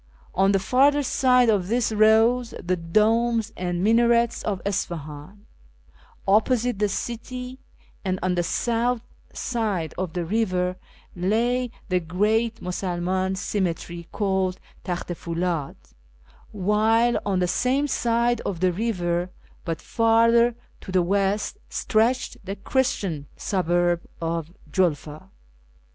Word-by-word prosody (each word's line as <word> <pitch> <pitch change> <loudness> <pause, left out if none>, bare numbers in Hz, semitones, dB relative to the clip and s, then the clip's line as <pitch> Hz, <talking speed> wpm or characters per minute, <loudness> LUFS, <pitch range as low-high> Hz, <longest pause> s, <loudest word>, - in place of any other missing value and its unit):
On 195 +1 +3
the 195 - +3
farther 275 +8 +3
side 250 -2 +3
of 200 -5 +2
this 235 +2 +1
rose 225 +3 +4
the 185 +1 -1
domes 220 +6 +1
and 175 0 -2
minarets 235 +2 +3
of 200 -3 -2
Isfahan; 175 0 -4 0.8
opposite 225 +2 +2
the 210 -1 +2
city, 250 +4 -5 0.4
and 185 -2 -1
on 185 -1 +1
the 175 - +1
south 235 +6 0 0.3
side 210 - -2
of 185 -3 -3
the 175 -2 -2
river, 185 -2 0 0.4
lay 235 +7 +1 0.2
the 180 -1 +2
great 215 +7 0
Musul 180 -1 -3
man 185 +2 0
cemetery, 175 -3 -3
called 190 -2 0 0.2
Takht 180 0 -4
i - - 0
Fuldd; 170 -3 -3 0.8
while 220 +4 +2
on 200 -2 0
the 180 -1 +1
same 255 +10 +1
side 235 -2 +1
of 185 -4 -4
the 185 0 +3
river, 180 -3 -1 0.4
but 165 -2 -4
farther 230 +1 +4 0.2
to 190 - -9
the 185 -1 +3
west, 200 - 0
stretched 230 +4 +1
the 195 +1 -5
Christian 195 - -1
suburb 175 -2 +1 0.2
of 165 -1 -3 0.2
Julfa. 155 0 -1
200 Hz, 125 wpm, -24 LUFS, 180-230 Hz, 0.8 s, rose